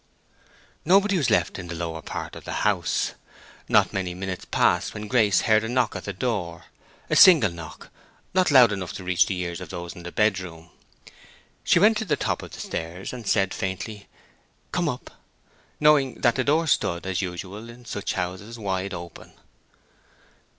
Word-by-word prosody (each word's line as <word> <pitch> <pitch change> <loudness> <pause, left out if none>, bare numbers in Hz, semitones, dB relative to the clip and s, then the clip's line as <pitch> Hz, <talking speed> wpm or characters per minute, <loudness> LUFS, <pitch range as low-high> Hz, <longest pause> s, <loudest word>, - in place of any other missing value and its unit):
Nobody 195 +4 +4
was 150 -8 +1
left - - +1
in 90 - -7
the 85 - -6
lower 80 -1 -4
part - - -6
of - - -10
the - - -3
house. - - +1 0.6
Not - - +4
many 90 -2 -3
minutes 95 0 -5
passed - - +1
when 105 0 -5
Grace 105 -6 +3
heard 110 -1 +3
a 110 - -3
knock 125 -1 +1
at - - -6
the 100 - -3
door—a 95 -5 -5
single 155 - +7
knock, 85 -2 -10 0.4
not 185 0 +3
loud 125 -6 +7
enough 95 -3 -4
to 95 - -7
reach 90 -1 +3
the 95 - -2
ears 85 0 -4
of 90 - -8
those 85 -2 -6
in 90 - -10
the 90 0 -8
bedroom. 90 -6 -1 0.9
She - - +4
went 210 +5 +5
to 220 - -2
the 165 - +1
top - - -2
of - - -9
the - - -11
stairs 85 +6 -5
and 120 -4 -8
said, 95 -3 +2
faintly, 100 +2 -5 0.6
"Come - - 0
up," - - -6 0.7
knowing 145 -4 +4
that 120 -2 +4
the 130 - 0
door 155 +4 +2
stood, 85 - 0
as 95 0 -1
usual 95 +5 -6
in 120 +1 -13
such 100 -3 -3
houses, 95 +5 -4
wide 95 -2 -3
open. 85 0 -10
100 Hz, 180 wpm, -25 LUFS, 90-120 Hz, 0.9 s, single